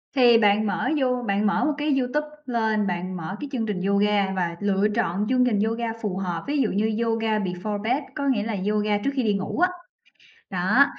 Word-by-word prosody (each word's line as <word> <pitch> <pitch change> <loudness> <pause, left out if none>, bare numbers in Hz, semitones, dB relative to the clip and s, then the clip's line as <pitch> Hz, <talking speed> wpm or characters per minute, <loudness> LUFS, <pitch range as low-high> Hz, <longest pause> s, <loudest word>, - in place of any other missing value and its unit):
Thì 240 -3 +6
bạn 210 -1 +3
mở - - -1
You 250 -1 +1
bạn 200 0 +1
mở 220 +3 +1
một 300 - +1
cái 290 -1 +1
YouTube 295 +4 -1 0.2
lên, 220 -4 0
bạn 180 0 -3
mở 170 +4 -5
cái 290 - -6
chương 240 -5 -1
trình 205 -4 -3
yoga 200 0 +2
và 175 -2 -1
lựa 205 0 +2
trọn 200 -3 0
chương 255 0 +3
trình 220 -5 +1
yoga 225 +2 0
phù 195 -4 -2
hợp, 175 -4 -3
ví 290 +1 0
dụ 225 - +1
như 220 +3 0
"Yoga 225 -1 0
before 200 +2 -3
bed", 255 +6 0
có 280 -2 -2
nghĩa 240 -6 +1
là 220 0 -2 0.2
yoga 210 0 +1
trước 240 +7 -1
khi 265 -3 0
đi 210 - +2
ngủ 195 - -3
á. 360 - +4 0.8
Đó, 200 +9 +4
215 Hz, 220 wpm, -24 LUFS, 200-245 Hz, 0.8 s, Thì